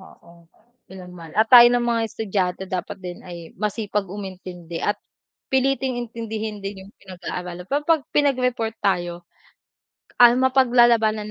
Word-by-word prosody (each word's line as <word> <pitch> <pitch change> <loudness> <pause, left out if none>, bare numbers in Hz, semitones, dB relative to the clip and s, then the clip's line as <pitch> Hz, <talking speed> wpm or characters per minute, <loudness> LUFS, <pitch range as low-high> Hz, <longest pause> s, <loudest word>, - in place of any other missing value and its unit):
Oo, 170 -3 -18 0.4
ilan 185 -1 -11
man. 165 -3 -12
At 220 +2 +2
tayo 240 -1 +10
ng 240 0 +1
mga 235 -1 0
estudyante 190 -4 -2
dapat 185 -1 -5
din 180 -1 -7
ay 170 -2 -10
masipag 210 -2 -2
umintindi 185 -3 -8
at 205 - 0 0.6
piliting 265 -1 +1
intindihin 220 -3 -6
din 195 -1 -6
'yong 200 - -16
pinag-aaralan. 180 -1 -8
Pero 285 +1 0
'pag 320 -2 +2
pinagreport 250 -5 0
tayo, 175 -3 -2 0.9
ah, 240 -1 +8
mapaglalabanan 240 -4 +3
210 Hz, 135 wpm, -22 LUFS, 180-240 Hz, 0.9 s, tayo